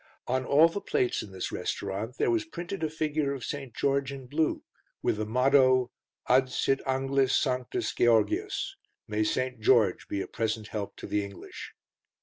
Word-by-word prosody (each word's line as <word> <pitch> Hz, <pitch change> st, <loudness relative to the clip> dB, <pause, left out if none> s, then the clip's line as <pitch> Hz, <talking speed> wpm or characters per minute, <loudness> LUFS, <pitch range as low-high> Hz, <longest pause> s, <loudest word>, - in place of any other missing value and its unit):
On 130 Hz, +1 st, 0 dB
all 150 Hz, +5 st, +6 dB
the 185 Hz, +5 st, -4 dB
plates 125 Hz, -9 st, 0 dB
in 100 Hz, -, -9 dB
this 95 Hz, -1 st, -4 dB
restaurant 100 Hz, +6 st, -3 dB
there -, -, +2 dB
was 340 Hz, -2 st, +1 dB
printed 195 Hz, -, -6 dB
a 160 Hz, -, +1 dB
figure 150 Hz, -2 st, -1 dB
of 125 Hz, -4 st, -6 dB
St. 140 Hz, -3 st, -5 dB
George 140 Hz, 0 st, +1 dB
in 135 Hz, -2 st, -8 dB
blue, 150 Hz, +5 st, 0 dB, 0.4 s
with -, -, +1 dB
the 105 Hz, 0 st, -2 dB
motto, 130 Hz, +1 st, +4 dB, 0.4 s
Adsit 130 Hz, +1 st, +3 dB
Anglis 135 Hz, 0 st, +2 dB
Sanctus 125 Hz, -2 st, -1 dB
Geogius 390 Hz, -, +1 dB, 0.3 s
May 105 Hz, 0 st, 0 dB
St. 130 Hz, +2 st, -1 dB
George 110 Hz, -4 st, +3 dB
be 100 Hz, -, -2 dB
a -, -, -2 dB
present 110 Hz, -1 st, -3 dB
help 105 Hz, -2 st, -4 dB
to -, -, -9 dB
the 105 Hz, 0 st, 0 dB
English. 100 Hz, -2 st, -9 dB
130 Hz, 165 wpm, -28 LUFS, 110-145 Hz, 0.4 s, all